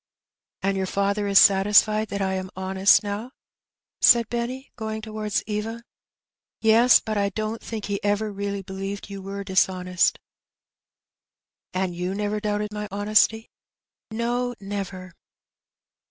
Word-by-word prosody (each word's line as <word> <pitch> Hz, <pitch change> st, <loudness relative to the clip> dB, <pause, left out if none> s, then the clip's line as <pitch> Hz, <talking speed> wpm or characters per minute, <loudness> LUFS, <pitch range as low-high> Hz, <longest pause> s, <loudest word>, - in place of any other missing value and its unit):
'' -, -, -69 dB
" -, -, -69 dB
And 195 Hz, 0 st, +1 dB
your 190 Hz, -1 st, -1 dB
father 200 Hz, +2 st, 0 dB
is 200 Hz, -1 st, +3 dB
satisfied 210 Hz, +3 st, +5 dB
that 200 Hz, -1 st, -3 dB
I 190 Hz, 0 st, -1 dB
am 185 Hz, 0 st, -4 dB
honest 190 Hz, +3 st, +3 dB
now? 205 Hz, +4 st, -4 dB, 0.4 s
" -, -, -69 dB, 0.3 s
said 235 Hz, -2 st, +6 dB
Benny, 245 Hz, +3 st, -4 dB
going 220 Hz, -2 st, -4 dB
towards 215 Hz, -1 st, -2 dB
Eva. 225 Hz, +2 st, -4 dB, 0.8 s
"Yes; 230 Hz, +2 st, +6 dB
but 215 Hz, -1 st, -3 dB
I 200 Hz, 0 st, +1 dB
don't 215 Hz, +3 st, -4 dB
think 220 Hz, -2 st, -6 dB
that -, -, -5 dB
he 200 Hz, -1 st, -3 dB
ever 205 Hz, +1 st, 0 dB
really 200 Hz, 0 st, -4 dB
believed 195 Hz, +1 st, -6 dB
you 195 Hz, -1 st, -6 dB
were 200 Hz, +1 st, -6 dB
dishonest." 185 Hz, -2 st, +1 dB, 0.8 s
" -, -, -61 dB
And 185 Hz, -1 st, -1 dB
you 180 Hz, +2 st, -3 dB
never 210 Hz, +1 st, -2 dB
doubted 210 Hz, 0 st, -2 dB
my 210 Hz, 0 st, -4 dB
honesty? 215 Hz, +2 st, +2 dB, 0.3 s
" -, -, -69 dB
"No, 240 Hz, +2 st, -2 dB
never." 195 Hz, -2 st, -6 dB
205 Hz, 155 wpm, -24 LUFS, 195-220 Hz, 0.8 s, said